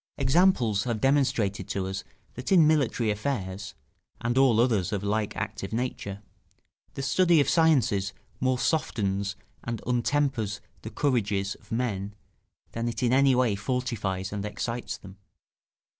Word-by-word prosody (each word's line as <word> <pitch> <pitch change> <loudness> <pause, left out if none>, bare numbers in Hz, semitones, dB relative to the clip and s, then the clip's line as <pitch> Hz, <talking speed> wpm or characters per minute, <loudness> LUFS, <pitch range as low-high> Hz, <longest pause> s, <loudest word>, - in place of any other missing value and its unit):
Examples 130 - +3
have 120 -3 -1
demonstrated 115 -8 +1
to 95 -1 -2
us 95 +1 -4 0.3
that 125 +8 -6
in 175 -5 +7
military 135 -7 +2
affairs, 105 -4 -3 0.4
and 120 +1 -1
all 130 -4 +5
others 110 -7 +2
of 100 -3 -1
the 100 - -4
like 105 0 -1
active 100 0 -4
nature, 110 -4 -3 0.7
the 135 - -4
study 175 +4 +4
of 140 - +3
sciences 130 - +3 0.3
more 130 0 +1
softens 100 -9 0 0.3
and 115 -1 -3
untempers 125 -3 0 0.2
the 110 - -6
courages 105 -6 0
of 105 - -20
men 105 -4 -2 0.6
than 115 +1 -3
it 120 - -4
in 120 0 +3
any 135 0 +5
way 125 -4 +3
fortifies 100 -4 -2
and 100 -1 -3
excites 115 +3 -4
them. 95 0 -13
115 Hz, 145 wpm, -27 LUFS, 100-130 Hz, 0.7 s, in